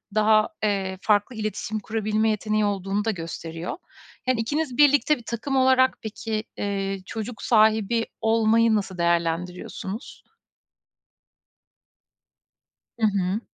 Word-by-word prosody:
daha, 215 0 +4
eee, 195 -3 0
farklı 210 +4 +2
iletişim 215 -1 -3
kurabilme 215 +1 0
yeteneği 215 0 0
olduğunu 200 +1 -1
da 225 - +2
gösteriyor. 165 -1 -6 0.5
Yani, 255 -2 +2
ikiniz 285 +2 -2
birlikte 290 +1 +5
bir 240 - -13
takım 235 +4 -3
olarak 260 0 +4
peki, 220 0 -3
eee, 195 -1 -2
çocuk 220 +1 -6
sahibi 220 0 +3 0.2
olmayı 225 0 +3
nasıl 195 -3 -2
değerlendiriyorsunuz? 170 - -2 2.7
Hı 220 - +3
hı. 195 0 0
215 Hz, 105 wpm, -24 LUFS, 195-225 Hz, 2.7 s, birlikte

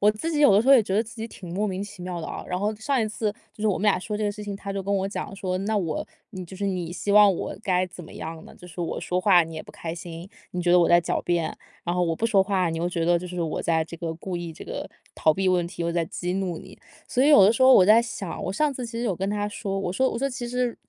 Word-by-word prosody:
我 210 - +5
自 215 +11 -4
己 300 - 0
有 285 - +7
的 210 - +5
时 - - -7
候 275 - +8
也 255 -4 +7
觉 190 -2 -3
得 215 - +3
自 225 +1 -12
己 225 +1 -5
挺 175 -5 -10
莫 205 +3 0
名 195 0 -3
其 205 -2 -11
妙 180 -2 -4
的 - - -5
啊。 - - -6
然 180 - -1
后 210 +2 -1
上 265 +5 0
一 - - 0
次 215 0 -2 0.2
就 - - -16
是 215 - +2
我 195 - +1
们 - - -5
俩 205 -3 +3
说 210 +3 -4
这 215 - -2
个 205 - 0
事 210 +1 -8
情， 200 -1 -5
他 200 0 -6
就 195 0 -3
跟 200 +1 -2
我 190 0 0
讲 195 0 -5
说： 185 -1 -2
“那 220 - +1
我 165 -6 -2 0.2
你 190 -4 -7
就 185 +2 -10
是 200 - -3
你 180 -4 -2
希 200 +3 -2
望 210 -1 +7
我 - - -4
该 185 -1 +1
怎 180 0 -10
么 155 - -12
样 160 0 -7
呢？ - - -14
就 180 - -14
是 175 0 -8
我 170 - -2
说 180 +1 -1
话 185 -3 +6
你 160 0 -9
也 155 - -5
不 - - -14
开 165 -1 -6
心， 170 +1 -8 0.3
你 180 -1 -2
觉 175 - +3
得 180 - +7
我 170 - +3
在 175 - +7
狡 - - -1
辩， 170 -2 -1 0.3
然 175 - -1
后 180 - +1
我 165 -1 0
不 225 - -3
说 205 -4 +4
话 190 -3 0
你 165 - -3
又 170 +1 0
觉 170 -2 -1
得 175 0 +3
就 180 - -7
是 175 -1 -3
我 160 - -2
在 160 -1 +1
这 165 - -10
个 165 -2 -3
故 175 +2 -5
意 170 -2 -6
这 - - -10
个 - - -6 0.3
逃 155 -1 +3
避 190 -1 +1
问 175 -2 +2
题， 175 -2 -5
我 170 - -1
在 170 -1 +1
激 180 +2 -4
怒 185 -3 -2
你。 - - -12 0.3
“所 255 - +1
以 285 - +5
有 290 -10 +8
的 210 - +6
时 260 - 0
候 260 0 +8
我 185 - +7
在 215 +3 +7
想， 220 -6 -5
我 - - -2
上 290 +9 +1
次 250 -2 -5
其 230 - -10
实 235 +1 -3
有 200 -6 0
跟 190 +3 -2
他 205 0 -1
说， 195 -2 -3
我 180 -2 -2
说 260 +6 +2
我 230 - -3
说： 275 - 0
“其 240 -1 -5
实 250 -1 -1
190 Hz, 355 characters per minute, -25 LUFS, 175-210 Hz, 0.3 s, 候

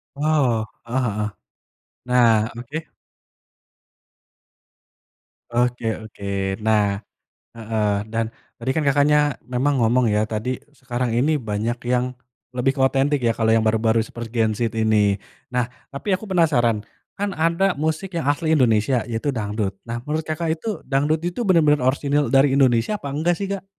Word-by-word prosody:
Wow, 140 -7 +1 0.2
heeh 125 +3 -1
heeh, 105 -1 -1 0.8
nah, 115 -3 +4
oke. 150 +7 -7 2.5
Oke 120 0 0 0.2
oke. 100 -2 -11 0.4
Nah 105 -2 +2 0.5
heeh, 110 -2 -1 0.2
dan 115 0 0 0.3
tadi 125 +3 -3
kan 160 - +1
Kakaknya 145 0 +3
memang 130 +2 +1
ngomong 115 0 +3
ya, 105 +1 +1
tadi 110 +4 -3 0.2
sekarang 125 -2 -2
ini 150 +5 +2
banyak 115 +1 -2
yang 125 0 +1 0.4
lebih 125 +2 +2
ke 135 - -1
otentik 135 +2 +2
ya 115 - +3
kalo 110 -1 +2
yang 110 -1 +4
baru-baru 110 +1 +2
seperti 115 0 -8
Gen 110 -1 +3
Z 115 0 -1
ini. 105 -2 +3 0.4
Nah, 125 -1 0 0.2
tapi 140 +9 -4
aku 200 - -9
penasaran, 130 - +2 0.3
kan 200 0 -2
ada 170 +3 +2
musik 160 +4 -2
yang 160 -4 -1
asli 160 +1 +1
Indonesia 120 -2 +3
yaitu 115 +4 -3
dangdut. 105 -4 -2
Nah, 115 +1 -3
menurut 155 +1 -1
Kakak 160 +1 -1
itu 210 +6 -4
dangdut 145 +3 +1
itu 175 +8 -2
bener-bener 150 -5 +4
orisinil 140 +2 +1
dari 135 0 +4
Indonesia 130 - +3
apa 140 - -5
enggak 160 +5 +1
sih, 200 - -2
Kak? 195 -1 -4
125 Hz, 145 wpm, -22 LUFS, 115-150 Hz, 2.5 s, nah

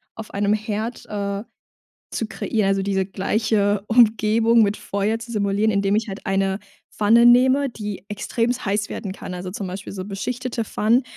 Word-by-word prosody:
auf 225 -1 -8
einem 200 +1 +1
Herd, 215 +2 -3
äh, 200 -1 -3 0.7
zu 225 - -2
kreieren, 215 -1 -1
also 195 0 +1
diese 195 -1 0
gleiche 205 +1 0
Umgebung 225 0 +4
mit 205 0 +1
Feuer 205 +3 -1
zu 235 +1 -9
simulieren, 205 +1 +1
indem 200 +1 +2
ich 220 0 -1
halt 195 +1 -7
eine 195 +1 0 0.3
Pfanne 230 +3 +4
nehme, 260 +3 +5
die 210 -5 -6
extremst 235 +4 -2
heiß 205 +1 0
werden 195 -4 -5
kann, 180 - -7
also 180 +1 -5
zum 195 +1 -5
Beispiel 185 +2 -6
so 190 -1 -5
beschichtete 230 +4 -3
Pfannen. 225 +4 +2
210 Hz, 165 wpm, -22 LUFS, 200-225 Hz, 0.7 s, nehme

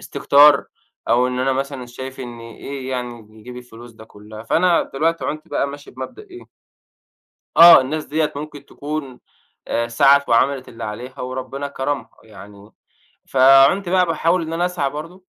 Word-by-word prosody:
استكتار، 145 0 +4 0.4
أو 125 +1 +3
إن 125 0 -4
أنا 130 +1 0
مثلًا 135 -1 -4
شايف 130 +2 -9
إن 120 -2 -8
إيه 130 +3 -8
يعني 120 -4 -7
يجيب 125 +3 -11
الفلوس 120 -1 -13
ده 110 0 -15
كلّها؟ 110 0 -13
فأنا 170 +8 +2
دلوقتي 165 +4 -2
عُنت 155 +2 -5
بقى - - -1
ماشي 145 +1 -11
بمبدأ 130 - -9
إيه 365 -3 -14 1.1
آه، 170 -4 +10
الناس 150 +4 -4
ديّة 155 0 -2
ممكن 145 -1 -9
تكُون 145 -3 -7 0.5
آآ، 115 0 -1
سعَت 140 +4 +3
وعملِت 130 +3 +1
اللي 115 0 -9
عليها 120 +5 -8
وربنا 130 +2 -5
كرَمها 140 +1 -4
يعني، 100 0 -15 0.6
فعُنت 135 +8 +4
بقى 185 0 +3
باحاول 165 +2 0
إن 160 0 -5
أنا 175 +2 0
أسعى 165 -6 -2
برضه 165 +6 -9
135 Hz, 155 wpm, -19 LUFS, 120-155 Hz, 1.1 s, آه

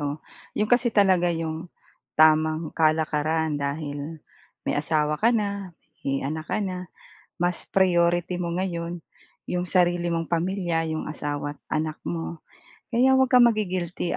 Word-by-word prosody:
oh. 145 0 -2 0.4
'Yon 210 - +2
kasi 245 0 +4
talaga 190 -5 +4
'yong 165 0 -3 0.5
tamang 155 0 +4
kalakaran 155 0 +1
dahil 145 +2 -4 0.4
may - - 0
asawa 150 0 0
ka 225 - +5
na, 200 -4 -2 0.3
may 135 0 -2
anak 155 +3 -4
ka - - 0
na, 185 -1 -5 0.5
mas 175 0 0
priority 175 -1 +2
mo 170 -1 -2
ngayon 175 -2 -3 0.5
'yong 180 0 -1
sarili 175 -1 +2
mong 165 -1 -2
pamilya, 175 -1 0
'yong 155 0 -3
asawa 145 -1 -4
at - - -37 0.2
anak 155 0 -3
mo. 80 -1 -4 0.5
Kaya 250 +3 +4
'wag 265 0 +4
kang 250 -1 +7
magi-guilty 185 -6 0
170 Hz, 140 wpm, -25 LUFS, 155-185 Hz, 0.5 s, kang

